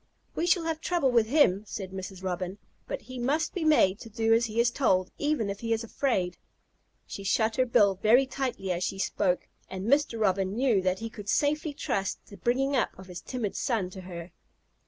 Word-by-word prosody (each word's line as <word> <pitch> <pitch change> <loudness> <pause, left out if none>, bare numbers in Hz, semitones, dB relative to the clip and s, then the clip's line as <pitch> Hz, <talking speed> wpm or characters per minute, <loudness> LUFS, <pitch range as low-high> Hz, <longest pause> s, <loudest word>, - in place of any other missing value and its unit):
"We 345 - -1
shall 355 -1 +3
have 325 -1 -2
trouble 335 -7 +1
with 230 -3 +3
him," 220 -8 +4
said 190 -2 -6
Mrs. 190 0 -7
Robin, 185 +1 -3 0.3
"but - - -4
he 255 +2 -8
must 285 +6 0
be 360 - -2
made 230 -11 +4
to 225 - -10
do 225 +1 +2
as 230 +1 +4
he 220 +1 -3
is 235 0 +4
told, 190 -9 +1
even 290 -7 0
if 200 0 -4
he 230 -1 0
is 225 +1 -1
afraid." 220 -7 -1 0.7
She 200 - -7
shut 220 +3 +1
her 255 -1 +3
bill 210 -5 +4
very 240 +5 +5
tightly 260 -8 -3
as 175 0 -1
she 195 - -2
spoke, 190 -1 0 0.2
and 190 +1 -5
Mr. 275 -2 +2
Robin 195 -1 +1
knew 240 -5 +3
that 185 0 +1
he 225 +2 -5
could 205 -2 -8
safely 295 +3 +1
trust 195 -6 -2
the 200 - -13
bringing 265 +7 +1
up 250 - 0
of 190 - -11
his 180 -2 -8
timid 235 -3 -4
son 210 -7 -1
to 190 - -8
her. 175 -1 -8
225 Hz, 210 wpm, -28 LUFS, 190-260 Hz, 0.7 s, very